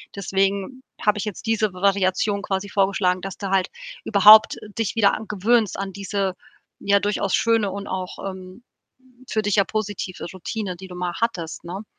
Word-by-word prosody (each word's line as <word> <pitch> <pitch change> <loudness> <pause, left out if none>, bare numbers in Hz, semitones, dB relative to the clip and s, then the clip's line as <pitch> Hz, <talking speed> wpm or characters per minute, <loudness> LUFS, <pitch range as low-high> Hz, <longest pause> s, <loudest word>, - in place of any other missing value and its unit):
Deswegen 195 +5 -1 0.2
habe 210 -1 +3
ich 210 - -3
jetzt 210 +1 -6
diese 220 -2 +1
V 180 0 -11
Variation 200 +1 +1
quasi 195 0 -2
vorgeschlagen, 190 -2 +1
dass 195 0 -6
du 200 - -4
halt 190 -1 +1 0.3
überhaupt, 215 +1 +7
äh, 210 - -11
dich 225 -1 -1
wieder 205 -3 +4
a 215 - -6
gewöhnst 215 +1 +1
an 195 -1 -4
diese, 195 -1 -2 0.4
ja, 200 0 +3
durchaus 200 -1 -1
schöne 225 -3 +2
und 200 +1 -6
auch, 185 -1 -5
ähm, 185 +3 -11 0.6
für 220 - -1
dich 205 -2 -1
ja 200 - +5
positive 205 -4 -4
Routine, 185 +1 -4
die 190 +2 -10
du 180 - -10
mal 180 -1 -3
hattest, 175 -10 -3
ne? 190 +5 -6
200 Hz, 180 wpm, -23 LUFS, 190-210 Hz, 0.6 s, überhaupt